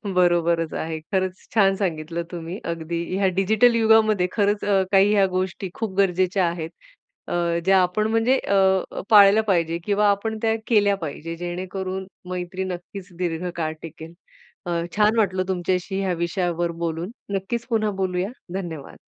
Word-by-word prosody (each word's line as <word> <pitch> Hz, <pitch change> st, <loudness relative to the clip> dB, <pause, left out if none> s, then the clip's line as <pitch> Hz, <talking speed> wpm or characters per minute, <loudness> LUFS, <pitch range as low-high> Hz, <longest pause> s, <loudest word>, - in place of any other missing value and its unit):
बरोबरच 170 Hz, -2 st, +2 dB
आहे. 160 Hz, 0 st, -3 dB
खरंच 185 Hz, -1 st, -2 dB
छान 195 Hz, -3 st, +4 dB
सांगितलं 170 Hz, -3 st, -3 dB
तुम्ही. 175 Hz, +2 st, -6 dB
अगदी 170 Hz, 0 st, -3 dB
ह्या 195 Hz, -1 st, +2 dB
डिजिटल 220 Hz, +5 st, +4 dB
युगामध्ये 220 Hz, -4 st, +4 dB
खरंच 205 Hz, -1 st, +1 dB
अ, 195 Hz, -2 st, +3 dB
काही 200 Hz, +1 st, +5 dB
ह्या 200 Hz, -2 st, +4 dB
गोष्टी 185 Hz, 0 st, -3 dB
खूप 220 Hz, -4 st, -4 dB
गरजेच्या 185 Hz, 0 st, +2 dB
आहेत. 165 Hz, -2 st, -5 dB, 0.6 s
अ, -, -, -4 dB, 0.3 s
ज्या 190 Hz, 0 st, +5 dB
आपण 210 Hz, +4 st, +1 dB
म्हणजे 230 Hz, +4 st, +3 dB
अ, 190 Hz, -1 st, +1 dB
पाळल्या 205 Hz, 0 st, +7 dB
पाहिजे 170 Hz, -3 st, +1 dB
किंवा 205 Hz, 0 st, +3 dB
आपण 220 Hz, +2 st, -1 dB
त्या 225 Hz, -1 st, +2 dB
केल्या 205 Hz, -3 st, +3 dB
पाहिजे, 160 Hz, +2 st, -5 dB
जेणेकरून 185 Hz, +2 st, -4 dB, 0.2 s
मैत्री 180 Hz, +1 st, -4 dB
नक्कीच 185 Hz, +1 st, -7 dB
दीर्घकाळ 170 Hz, -2 st, -2 dB
टिकेल. 165 Hz, 0 st, -10 dB, 0.5 s
अ, 175 Hz, -, -3 dB, 0.3 s
छान 215 Hz, +2 st, +3 dB
वाटलं 190 Hz, -4 st, +2 dB
तुमच्याशी 185 Hz, +1 st, -1 dB
ह्या 190 Hz, -2 st, 0 dB
विषयावर 170 Hz, 0 st, -1 dB
बोलून. 165 Hz, +5 st, -3 dB, 0.2 s
नक्कीच 230 Hz, +5 st, -3 dB
पुन्हा 215 Hz, -2 st, +1 dB
बोलूया. 185 Hz, +1 st, -1 dB, 0.2 s
धन्यवाद. 170 Hz, -7 st, -6 dB
185 Hz, 145 wpm, -23 LUFS, 175-205 Hz, 0.6 s, पाळल्या